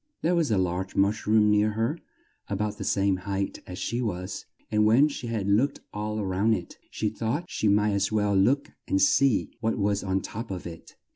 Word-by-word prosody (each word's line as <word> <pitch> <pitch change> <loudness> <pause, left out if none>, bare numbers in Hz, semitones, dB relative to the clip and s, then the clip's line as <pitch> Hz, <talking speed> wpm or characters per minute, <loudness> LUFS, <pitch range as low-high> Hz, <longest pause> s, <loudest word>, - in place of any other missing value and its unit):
There 170 - +2
was 170 -4 +2
a 105 - +2
large 95 +1 -1
mush 100 +3 +1
room 105 -1 +4
near 105 +1 +3
her, 115 +10 -1 0.5
a - - -2
bout 105 0 -3
the - - -3
same 100 -1 +1
height 100 +1 -3
as 90 - -7
she 120 +4 -2
was, 90 -5 -4 0.2
and 105 0 +3
when 115 +7 +5
she 125 -4 -6
had 110 -4 -2
looked 110 +8 +2
all 105 0 -3
round 100 +4 +2
it, 85 - -8
she 110 - -2
thought 115 +9 -2
she 110 - 0
might 105 +1 +3
as 100 +1 0
well 105 -2 +1
look 130 +9 +2 0.2
and 95 - +1
see 115 +5 +3
what 115 0 -1
was 100 -1 0
on 95 -1 0
the 95 - -3
top 115 +2 -6
of 95 -2 -5
it. 85 -2 -10
105 Hz, 215 wpm, -27 LUFS, 95-115 Hz, 0.5 s, when